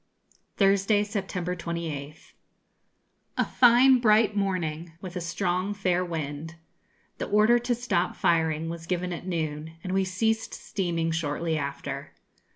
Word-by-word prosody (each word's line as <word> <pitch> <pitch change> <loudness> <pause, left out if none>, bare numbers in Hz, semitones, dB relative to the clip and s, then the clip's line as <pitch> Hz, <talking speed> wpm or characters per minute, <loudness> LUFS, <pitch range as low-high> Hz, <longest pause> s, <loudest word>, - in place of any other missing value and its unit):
_ - - -43
Thursday, 200 +1 +3
September 190 -4 -3
28th, 165 -4 -6 1.0
A - - +2
fine 250 +1 +6
bright 215 -2 +4
morning, 175 -5 -2
with 180 -1 -8
a 180 - -2
strong, 180 +3 -1
fair 185 -2 +1
wind. 160 -1 -5 0.6
The - - -2
order 215 +4 +4
to 240 0 0
stop 225 -7 0
firing 160 -1 +1
was 165 0 -6
given 180 0 -1
at 175 +2 -7
noon, 160 -2 -3
and 185 - -3
we 190 0 +3
ceased 220 +4 -1
steaming 170 -4 -2
shortly 160 0 -1
after. 140 -1 -4
180 Hz, 135 wpm, -27 LUFS, 165-200 Hz, 1.0 s, fine